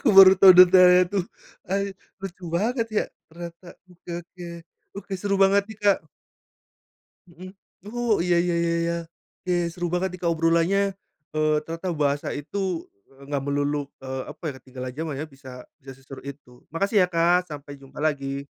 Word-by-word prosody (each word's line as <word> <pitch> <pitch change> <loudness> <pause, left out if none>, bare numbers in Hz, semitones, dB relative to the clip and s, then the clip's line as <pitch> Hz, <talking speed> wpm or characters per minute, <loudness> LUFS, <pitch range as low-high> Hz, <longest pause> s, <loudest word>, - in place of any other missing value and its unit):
Aku 225 -8 +3
baru 190 -1 +10
tahu 190 -1 +10
detailnya 180 0 +8
tuh, 195 -3 0 0.5
eh, 200 0 0 0.3
lucu 185 -1 -7
banget 230 +6 0
ya - - +2 0.2
ternyata. 170 +1 -10 0.2
Oke 175 0 -14
oke, 175 +1 -12 0.5
oke 200 0 -8
seru 200 +1 -1
banget 195 +1 +5
nih 220 -1 -10
Kak! 200 -1 +4 1.3
Mhm, 185 +3 -11 0.4
oh 240 -3 +1
iya 175 -1 +2
iya 175 -1 0
iya 170 0 +1
iya. 170 0 -1 0.5
Iya, 175 -1 +1
seru 175 -1 -3
banget 185 +1 0
nih 185 - -8
Kak 170 - +1
obrolannya, 170 +5 +2 0.4
eee, 155 0 +2
ternyata 165 +3 -5
bahasa 145 -1 0
itu, 180 +4 -3 0.2
eee, 135 0 -18
nggak 140 -2 -1
melulu, 145 0 -1
eee, 130 0 -4
apa - - -12
ya, - - -6
ketinggalan 130 -1 -8
jaman 160 -2 -3
ya. - - -3
Bisa 135 -3 -14 0.3
bisa 135 0 -10
seseru 135 0 -11
itu. 135 -3 -11
Makasih 200 +5 0
ya 180 - +3
Kak 175 +1 +2
sampai 145 -1 -9
jumpa 135 0 -17
lagi! 140 -2 -2
170 Hz, 170 wpm, -24 LUFS, 145-190 Hz, 1.3 s, baru